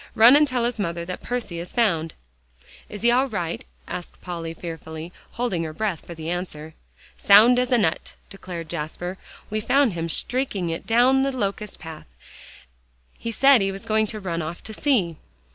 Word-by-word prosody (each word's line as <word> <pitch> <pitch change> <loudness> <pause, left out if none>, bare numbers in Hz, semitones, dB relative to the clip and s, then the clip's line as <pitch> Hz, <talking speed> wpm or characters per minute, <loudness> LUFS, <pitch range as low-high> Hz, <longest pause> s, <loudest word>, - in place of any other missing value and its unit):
Run 235 +5 +8
and 300 0 +5
tell 250 -3 0
his 240 -2 -2
mother 170 -3 -2
that 180 +1 -6
Percy 235 -8 -3
is 175 - -7
found." 165 -9 +1 0.7
"Is 210 +1 -8
he 235 - +5
all 260 +3 +3
right?" 175 -6 -3 0.2
asked 175 - -7
Polly 170 -2 -5
fearfully, 160 0 -7 0.2
holding 235 -8 -1
her 155 -1 -5
breath 195 -2 -3
for 170 - -7
the 160 0 -7
answer. 160 -3 -5 0.5
"Sound 225 +5 +7
as 250 0 0
a 245 - +5
nut," 165 -8 0
declared 180 -4 -7
Jasper; 175 +3 -5 0.3
"we 215 0 -1
found 260 0 +3
him 165 0 -3
streaking 205 -4 0
it 165 - -5
down 250 +4 +4
the 275 0 +1
locust 210 -4 -3
path; 160 - -10 1.1
he 230 - -3
said 270 +1 +6
he 195 0 +1
was 195 0 -8
going 215 0 +2
to 215 - -5
run 170 -4 -3
off 165 +2 -6
to 220 - -7
sea." 205 - +1
195 Hz, 180 wpm, -24 LUFS, 170-240 Hz, 1.1 s, Run